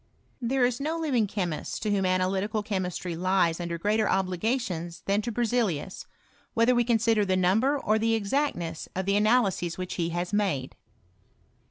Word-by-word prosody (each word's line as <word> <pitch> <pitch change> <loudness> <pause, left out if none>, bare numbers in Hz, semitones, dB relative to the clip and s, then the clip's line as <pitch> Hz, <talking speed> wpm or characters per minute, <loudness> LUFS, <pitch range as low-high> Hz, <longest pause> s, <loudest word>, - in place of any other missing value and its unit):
There 250 +1 +2
is 245 0 -1
no 310 +4 -2
living 265 -10 +1
chemist, 180 -6 -3
to 210 - 0
whom 195 -2 +1
analytical 190 +3 0
chemistry 185 -4 -3
lies 180 -1 +1
under 170 -1 -3
greater 210 +4 +1
obligations 185 -2 -1
than 200 +2 +1
to 235 - -3
Ber 240 +2 -1
zelius, 210 -8 -1 0.5
whether 230 +2 +4
we 240 -1 +3
consider 225 -2 +2
the 190 -2 +1
number 220 +11 +3
or 220 -5 +1
the 225 +1 +2
ex 200 -3 -3
actness 175 - -1
of 190 0 -2
the 200 +1 +2
analyses 205 -5 +2
which 185 0 -4
he 165 - 0
has 175 +3 -3
made. 190 -11 0
200 Hz, 170 wpm, -27 LUFS, 180-230 Hz, 0.5 s, whether